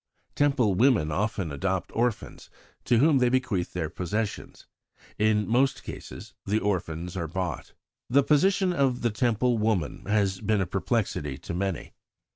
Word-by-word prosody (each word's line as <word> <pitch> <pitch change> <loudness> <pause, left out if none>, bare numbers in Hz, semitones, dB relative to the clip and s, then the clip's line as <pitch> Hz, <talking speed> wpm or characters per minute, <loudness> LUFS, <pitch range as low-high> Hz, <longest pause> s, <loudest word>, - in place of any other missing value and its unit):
Temple 135 -8 +2
women 105 - +3
often 100 -2 -1
adopt 95 +5 -2
orphans, 120 -1 -2 0.4
to 120 - +3
whom 145 +2 +4
they 125 -1 +3
bequeath 120 -8 -1
their 85 -3 -2
possessions. 100 +6 -4 0.5
In 105 0 +2
most 130 +4 +2
cases - - -9
the 105 +2 0
orphans 90 -4 -2
are 85 -3 -2
bought." 90 +2 -4 0.4
The 140 +3 +4
position 180 +6 +3
of 135 -5 +1
the 120 - +1
Temple 120 +1 +1
woman 105 -8 -1
has 100 -2 +1
been 110 -1 +1
a 95 - +1
perplexity 95 - -2
to 85 - -7
many. 95 -1 -3
105 Hz, 145 wpm, -27 LUFS, 90-125 Hz, 0.5 s, whom